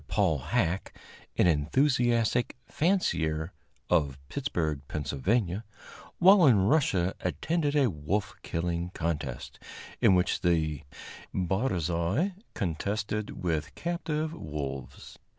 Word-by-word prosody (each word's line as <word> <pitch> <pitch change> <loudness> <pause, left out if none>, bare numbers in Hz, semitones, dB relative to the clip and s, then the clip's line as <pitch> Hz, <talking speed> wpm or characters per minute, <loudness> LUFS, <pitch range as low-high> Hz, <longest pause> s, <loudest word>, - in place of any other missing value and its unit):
Paul 80 -2 +2
Hacke, 85 +7 -1 0.4
an - - +5
enthusiastic 120 - +2
fancier, 85 - 0 0.3
of 75 -6 +2
Pittsburg, 80 -4 -2
Pa., - - -5 1.2
while 185 -2 +7
in 105 -7 +5
Russia 100 - +2
attended 160 -3 -1
a 140 -3 +4
wolf 95 +6 -2
killing 85 +1 -2
contest 80 -7 -3 0.4
in 95 - +6
which 90 0 +1
the 80 -4 +1 0.5
barzois 95 - 0 0.2
contested 100 +5 -3
with 80 -3 -1
captive 160 -2 -2
wolves. 70 - -6
90 Hz, 95 wpm, -29 LUFS, 80-125 Hz, 1.2 s, while